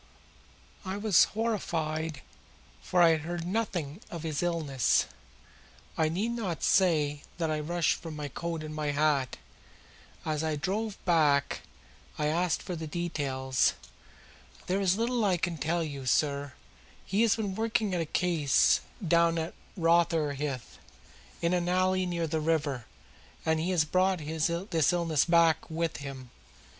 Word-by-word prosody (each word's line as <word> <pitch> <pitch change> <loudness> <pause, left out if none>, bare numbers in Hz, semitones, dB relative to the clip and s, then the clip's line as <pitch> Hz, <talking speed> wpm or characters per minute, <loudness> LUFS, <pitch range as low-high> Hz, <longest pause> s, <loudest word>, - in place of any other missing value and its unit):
I 190 0 -4
was 205 -4 +5
horrified 160 - -2 0.6
for 180 -1 +3
I 170 - +7
had 160 -1 +2
heard 170 +1 -4
nothing 180 -5 -2
of 170 -2 -6
his 155 -3 -2
illness. 160 -7 +1 0.9
I 160 -1 +2
need 200 +8 -1
not 205 -8 -3
say 150 -6 +3 0.2
that 165 -2 -1
I 155 - 0
rushed 170 +1 0
for 165 - -7
my 150 -2 -5
coat 165 +3 -4
and 155 0 -6
my 155 -1 -3
hat. 145 -3 +1 0.9
As 155 -1 -1
we 155 -1 -1
drove 205 +7 -2
back 150 -5 +3 0.6
I 150 - 0
asked 170 +3 +1
for 180 - -4
the 160 -1 -5
details. 140 -6 0 0.9
"There 190 +2 0
is 190 0 +2
little 235 +1 0
I 190 -3 +3
can 170 -1 -2
tell 165 +4 0
you, 140 -4 -6
sir. 140 0 +1 0.5
He 200 +3 +1
has 230 -2 +4
been 210 -4 -2
working 220 -1 0
at 175 - 0
a - - -1
case 160 -3 +3 0.3
down 170 0 +4
at 160 0 -3 0.2
Rotherhithe, 155 -6 +1 0.8
in 170 +1 +2
an 175 -1 0
alley 185 0 +2
near 170 -1 -1
the 160 0 -1
river, 145 -6 0 0.6
and 160 0 +2
he 165 +3 -1
has 175 -5 +2
brought 185 +3 +2
this 160 - 0
illness 165 -4 +2
back 170 -1 +3
with 165 0 -2
him. 135 -3 -8
165 Hz, 150 wpm, -29 LUFS, 150-180 Hz, 0.9 s, I